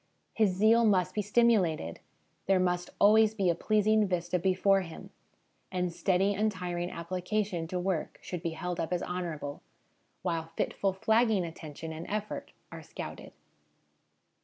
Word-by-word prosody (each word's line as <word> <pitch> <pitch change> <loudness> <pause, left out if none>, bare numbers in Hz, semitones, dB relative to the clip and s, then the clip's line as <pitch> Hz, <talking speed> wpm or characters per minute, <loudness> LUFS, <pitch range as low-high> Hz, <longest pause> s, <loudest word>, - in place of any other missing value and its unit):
His 215 -3 +3
zeal 220 +4 +5
must 185 -4 +3
be 210 - 0
stimulated; 205 - +2 0.5
there 190 -1 +4
must 180 -1 0
always 215 +1 +5
be 190 -5 +2
a - - +1
pleasing 215 +3 +2
vista 180 0 -1
before 190 +2 +3
him; 165 -3 -9 0.6
and 180 -2 -1
steady, 190 +3 +2
untiring 180 -4 -1
application 180 +1 -2
to 180 +2 -3
work 180 -3 -2
should 180 -2 -6
be 170 -1 -2
held 180 -1 -3
up 165 - -2
as 180 0 0
honourable, 165 -5 -4 0.6
while 165 -2 -2
fitful, 195 - 0
flagging 220 -1 +2
attention 160 -1 -7
and 160 +2 -7
effort 210 0 -4 0.2
are - - -8
scouted. - - -8
185 Hz, 140 wpm, -30 LUFS, 170-210 Hz, 0.6 s, zeal